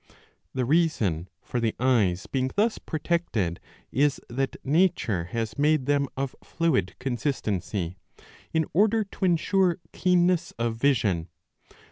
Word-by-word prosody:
The 130 -1 +1
reason 120 - +1
for 125 - -2
the 115 -2 0
eyes 110 -8 +2
being 130 -1 -1
thus 215 +3 +2
protected 150 - -1 0.3
is 140 +2 +2
that 135 +3 -2
nature 140 - +2
has 110 +5 -4
made 150 -2 +3
them 140 0 +2
of 135 -1 -2
fluid 150 - 0
consistency, 105 - -2 0.5
in 160 -1 +1
order 215 +5 +4
to 195 -1 -4
ensure 180 +1 +2 0.2
keenness 180 -1 +2
of 115 -1 -1
vision. 110 -10 +1
135 Hz, 120 wpm, -26 LUFS, 110-165 Hz, 0.5 s, order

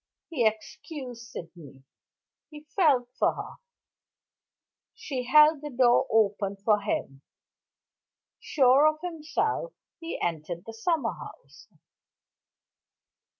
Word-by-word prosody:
He 245 -8 +2
excused 235 +2 -6
Sydney; 160 -9 -11 0.7
he 300 -1 -11
felt 275 -10 +3
for - - +2
her. - - -8 1.4
She 255 -4 -5
held 300 +2 +6
the 300 - -6
door 250 0 +3
open 205 -2 +1
for 205 +1 +2
him. 135 -9 -3 1.2
Sure 270 +1 +4
of 310 0 0
himself, 355 +9 -2 0.3
he 330 0 -6
entered 170 +1 -4
the 225 - -8
summer 310 +7 -1
house. - - -13
250 Hz, 100 wpm, -27 LUFS, 205-305 Hz, 1.4 s, held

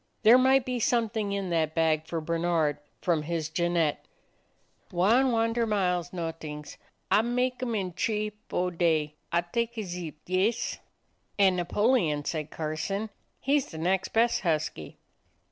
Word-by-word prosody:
There 235 +3 +8
might 265 0 +4
be 250 -1 -2
something 225 -3 0
in 195 -2 -2
that 160 -2 0
bag 160 -1 +2
for 165 0 -2
Bernard 165 -2 0 0.2
from 170 -4 +2
his 160 0 -3
Jeannette. 170 -2 0 0.9
"Wan 225 +10 +4
honder 230 0 +1
mile 185 -4 +1
's 175 - -13
not'ings. 160 -4 -6 0.3
Ah 205 +2 +6
make 250 +2 -1
'em 240 -3 -1
in 185 -4 -2
t'ree 210 +3 -1
— - - -45
fo' 180 0 0
day. 160 -3 +1 0.2
Ah 170 - +3
taka 230 +5 -2
Zip, 175 -4 -6
yes?" 195 +6 0 0.6
"And 195 -2 +5
Napoleon," 175 - +1
said 155 -2 -3
Carson; 165 +8 -3 0.3
"he's 280 0 +1
the 160 - -9
next 180 +4 +1
best 230 +1 +2
husky." 155 - -2
180 Hz, 145 wpm, -28 LUFS, 165-225 Hz, 0.9 s, There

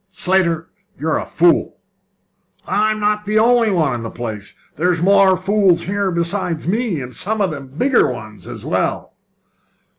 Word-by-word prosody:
"Slater, 175 -3 +1 0.3
you're 160 +1 -1
a - - -6
fool!" 170 +1 +2 0.9
"I'm 215 +3 0
not 210 0 0
the 215 +1 +1
only 230 0 +4
one 160 -9 +1
in 120 - -4
the 115 - -5
place! 110 -4 -7 0.2
There's 175 +2 +1
more 195 +1 +4
fools 190 -2 +2
here 200 +1 -1
besides 170 -1 -2
me, 215 - 0
and 125 -1 -9
some 215 - -3
of 195 -4 +1
them 140 -3 -7
bigger 205 - +2
ones 110 -3 -10
as - - -8
well!" - - -2
180 Hz, 155 wpm, -18 LUFS, 155-205 Hz, 0.9 s, only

